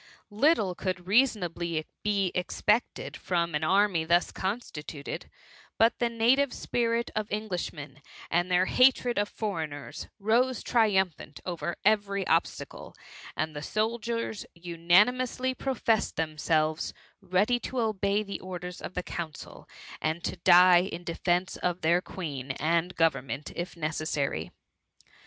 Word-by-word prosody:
Little 215 - +3
could 180 -1 -3
reasonably 175 -8 +1 0.2
be 200 -3 +1
expected 210 +5 0
from 170 -2 -1
an 150 +1 -1
army 190 -1 +3
thus 170 +2 +2
constituted, 165 -8 -5 0.5
but 225 +1 +3
the 240 - +2
native 245 +4 +3
spirit 235 -1 -1
of 215 0 -2
Englishmen, 175 -9 -4 0.3
and 175 +2 +1
their 180 +1 +3
hatred 250 0 +4
of 205 0 0
foreigners, 160 -9 -5
rose 235 +5 +1
triumphant 190 -10 +1
over 175 -1 -3
every 200 -2 +2
obstacle; - - -1 0.4
and 155 -1 -2
the 145 - -4
soldiers 225 +4 -2
unanimously 205 +10 +2
professed 250 -5 0
themselves 155 0 0 0.3
ready 200 +6 +2
to 255 +1 -4
obey 210 -2 +1
the 200 -1 -6
orders 180 -1 -7
of - - -7
the 180 - -2
council, 165 -4 -7 0.3
and 160 +2 -1
to - - -2
die 175 +1 +7
in 180 -2 -5
defence 175 +1 -1
of 180 0 -2
their 170 +3 +3
Queen 145 -9 -6
and 170 +5 0
government 145 -3 0
if 175 0 -5
necessary. 155 -2 -2
185 Hz, 125 wpm, -28 LUFS, 165-220 Hz, 0.5 s, die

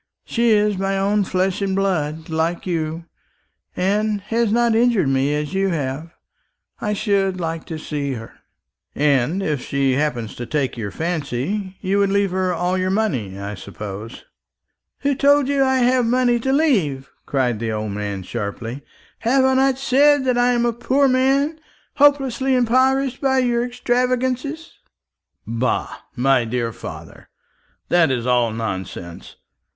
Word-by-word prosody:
She 235 0 +1
is 210 -2 +3
my 195 0 0
own 200 +1 +2
flesh 185 +1 0
and 195 -1 0
blood, 160 -5 -1
like 165 +2 -1
you, 165 -2 -3 0.7
and 205 +3 0
has 225 +2 0
not 235 0 +3
injured 225 - +3
me 135 +2 +1
as 150 +3 -3
you 195 0 +1
have. 150 -1 -3 0.7
I 210 - -1
should 195 -3 0
like 165 -1 -3
to 160 - -6
see 145 -3 -3
her." 115 -2 -8 0.6
"And 145 +5 +1
if 150 -7 -1
she 140 -1 0
happened 125 -5 -1
to 120 - -5
take 145 -4 -1
your 110 -4 -4
fancy, 170 - -3
you 195 +1 +1
would 200 -1 +3
leave 200 -1 +1
her 185 0 0
all 180 +2 0
your 185 0 0
money, 140 - -1
I 100 +1 -5
suppose?" 105 +3 -8 0.8
"Who 280 0 +1
told 285 0 +3
you 280 0 0
that 270 - +4
I 265 0 +2
have 250 -1 +3
money 245 0 +2
to 265 +3 -1
leave?" 195 - +1 0.2
cried 125 -5 0
the 115 -1 -2
old 110 -1 -3
man 100 -1 -4
sharply. 115 +6 -5 0.4
"Have 260 +3 +3
I 265 - +3
not 265 0 +3
said 275 +1 +3
that 255 -1 +2
I 245 +1 +3
am 240 0 +1
a 235 - +1
poor 265 +4 +2
man, 270 +4 +2 0.4
hopelessly 270 -2 +3
impoverished 260 +2 +2
by 265 -1 +2
your 240 -2 +2
extravagance?" 255 +5 -1 0.7
"Bah, 115 +2 -1 0.2
my 130 0 +3
dear 115 0 -2
father, - - -10 0.6
that 175 -3 +4
is 125 -3 -1
all 125 -2 +2
nonsense. 95 -5 -6
190 Hz, 155 wpm, -21 LUFS, -, 0.8 s, that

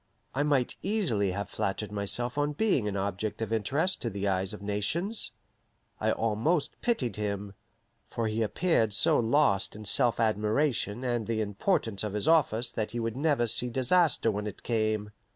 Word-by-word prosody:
I 135 - 0
might 145 -4 +1
easily 175 - +1
have 100 +1 -3
flattered 100 +1 -3
myself 105 +4 -2
on 145 0 0
being 145 - +1
an 100 -1 -2
object 100 +2 -3
of 115 0 -2
interest 140 - 0
to 120 - -2
the 100 -1 -3
eyes 95 0 0
of 105 -1 -8
nations. 135 - -1 0.7
I - - +1
almost 115 +9 0
pitied 130 - 0
him; 100 -1 -3 0.6
for 115 - -2
he 110 +1 -1
appeared 115 - +1
so - - +4
lost 115 -5 +2
in 105 0 -9
self 115 +4 +4
admiration 110 +2 +1
and 120 -3 -1
the 115 -1 -1
importance 105 - 0
of 105 -2 -3
his 105 +7 -2
office 125 -8 +3
that 110 -1 -2
he 120 - -2
would 115 0 -2
never 140 -3 +2
see 120 +2 +2
disaster 130 0 +3
when 105 0 -3
it 105 - -8
came. 110 -2 -1
115 Hz, 170 wpm, -29 LUFS, 105-140 Hz, 0.7 s, so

